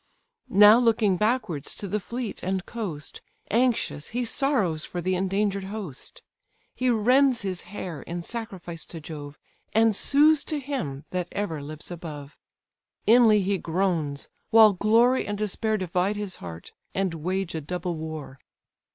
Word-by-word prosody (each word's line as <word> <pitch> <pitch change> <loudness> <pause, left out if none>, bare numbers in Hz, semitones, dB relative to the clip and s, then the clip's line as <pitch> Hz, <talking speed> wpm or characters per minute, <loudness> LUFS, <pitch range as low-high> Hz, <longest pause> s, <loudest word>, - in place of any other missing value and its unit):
Now 210 +3 +8
looking 225 -5 +3
backwards 210 - -1
to 200 - -5
the 210 +3 -1
fleet 235 +2 -5
and 190 0 -2
coast, 180 -11 -6 0.3
Anxious 235 - +1
he 245 +2 -2
sorrows 220 - +1
for 175 - -5
the 185 +2 0
endangered 195 +1 0
host. 195 -9 -8 0.5
He 255 0 0
rends 250 +2 +3
his 185 -2 -3
hair, 180 -7 -6
in 170 0 -5
sacrifice 190 -7 -6
to 165 - -9
Jove, 150 -2 -8 0.4
And 225 -1 +4
sues 295 +6 +4
to 305 - -2
him 240 - -4
that 180 -1 -2
ever 165 -8 -3
lives 155 +4 -8
above: 155 -4 -8 0.7
Inly 220 -3 +6
he 195 0 0
groans; 165 -5 -1 0.2
while 220 -2 +7
glory 230 +6 +3
and 205 0 -2
despair 215 +1 -1
Divide 185 +2 0
his 205 -3 -4
heart, 85 -2 -9 0.2
and 190 -2 0
wage 180 +3 -2
a 160 - -3
double 180 +3 -3
war. 155 -4 -7
195 Hz, 145 wpm, -26 LUFS, 165-225 Hz, 0.7 s, Now